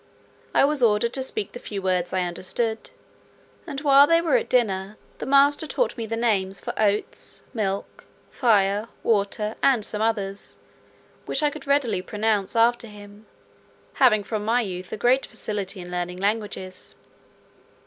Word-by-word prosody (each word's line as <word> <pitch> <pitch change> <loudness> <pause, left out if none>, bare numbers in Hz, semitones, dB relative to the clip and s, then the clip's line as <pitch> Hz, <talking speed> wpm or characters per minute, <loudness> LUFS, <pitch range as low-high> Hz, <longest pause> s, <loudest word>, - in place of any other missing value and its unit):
I - - +6
was 295 -1 +1
ordered 230 0 +3
to 265 - 0
speak 215 -5 -3
the 245 - -8
few 205 -4 -6
words 185 -2 0
I 185 - 0
understood; 220 +6 -3 0.8
and 280 -3 -5
while 280 -1 +6
they 330 +1 +4
were 335 +7 +1
at 475 -1 0
dinner, 205 -4 0 0.2
the - - -5
master 285 +3 +4
taught - - -1
me 230 -2 -5
the 225 +1 -3
names 195 -5 +1
for - - -5
oats, 210 -1 -1
milk, 200 -4 -3 0.3
fire, 210 -3 +2 0.2
water, 210 0 0
and 250 -6 +3
some 210 - -2
others, 205 -3 -2 0.7
which 275 - 0
I 295 - +3
could - - -10
readily 280 -9 +1
pronounce 210 +1 -1
after 235 +1 +3
him, 205 0 -13 0.7
having 225 -6 +4
from 215 0 -3
my 235 +3 +2
youth 185 -4 -6
a - - -4
great 250 +5 +2
facility 200 -2 -4
in 175 0 -9
learning 180 0 -3
languages. 200 -2 -3
215 Hz, 160 wpm, -24 LUFS, 195-245 Hz, 0.8 s, I